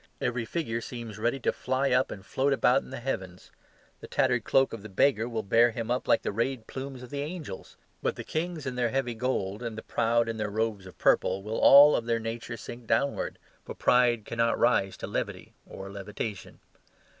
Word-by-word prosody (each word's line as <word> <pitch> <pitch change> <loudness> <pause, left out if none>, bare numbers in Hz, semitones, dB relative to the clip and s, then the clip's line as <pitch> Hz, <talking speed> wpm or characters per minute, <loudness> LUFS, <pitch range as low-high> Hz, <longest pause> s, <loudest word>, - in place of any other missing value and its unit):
Every 120 -1 -1
figure 115 -5 -3
seems 115 -3 -7
ready 120 +5 0
to - - +2
fly 130 +2 0
up 125 +1 +3
and 95 -1 -8
float 140 +6 +1
about 135 0 +3
in - - -13
the 130 - -6
heavens. 95 -8 -5 0.5
The - - -10
tattered - - +1
cloak 135 0 +3
of 115 - -6
the 110 - -9
beggar 115 +3 +2
will 115 -2 -3
bear 115 +4 +5
him 115 0 -4
up 125 - -1
like - - +3
the - - -1
rayed 115 +2 -2
plumes 130 0 -7
of 125 - -11
the 140 -1 -3
angels. 155 - -7 0.2
But - - -1
the - - -6
kings 160 -1 -3
in 130 - -2
their 125 -1 0
heavy 130 -1 -1
gold 110 -4 -2
and 115 -2 -5
the 110 - -6
proud 115 0 +1
in 115 -1 -3
their 105 -1 -2
robes 105 -2 -2
of 95 - -14
purple 95 +1 +2
will 110 +2 -3
all 145 +2 +9
of 115 - -2
their 115 -1 +1
nature 115 +1 -5
sink 120 +2 -9
downwards, 140 +5 0 0.3
for - - -8
pride 120 -3 +3
cannot 115 0 0
rise 110 -5 +2
to - - -5
levity - - -4
or 95 0 -8
levitation. 100 +1 -6
115 Hz, 210 wpm, -28 LUFS, 110-130 Hz, 0.5 s, all